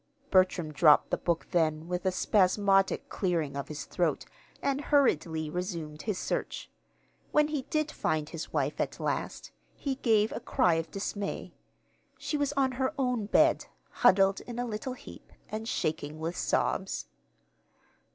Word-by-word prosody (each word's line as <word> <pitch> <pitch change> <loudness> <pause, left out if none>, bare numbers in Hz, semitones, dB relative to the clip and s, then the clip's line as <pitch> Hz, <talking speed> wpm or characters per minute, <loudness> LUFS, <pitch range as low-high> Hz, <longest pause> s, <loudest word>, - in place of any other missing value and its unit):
Bertram 185 -4 +3
dropped 150 0 +5
the - - +2
book 170 -1 -1
then 160 -2 +1
with 180 +1 -2
a - - +3
spasmodic 195 0 +2
clearing 170 -7 -1
of 140 - -4
his 150 -2 -6
throat, 175 -3 -1 0.3
and 280 0 0
hurriedly 165 - +2
resumed 165 -3 -4
his 210 -4 -2
search. - - -3 0.6
When 300 0 +3
he 290 -4 -3
did 305 -1 0
find 155 - -1
his 165 0 -7
wife, 145 -1 -1
at - - -3
last, - - -3 0.2
he 270 -2 -3
gave 220 -4 +3
a - - -4
cry 175 - +2
of 165 0 -1
dismay 200 0 -4 0.6
she - - -3
was 290 -1 +1
on 270 -2 +2
her 260 +3 -1
own 250 -6 0
bed, - - +3 0.2
huddled 195 -4 +4
in 240 -1 -6
a 245 - -1
little 240 +3 -4
heap, - - -13 0.2
and 220 +1 -5
shaking 155 -1 -2
with 165 +2 -3
sobs. - - -1
190 Hz, 150 wpm, -29 LUFS, 160-245 Hz, 0.6 s, dropped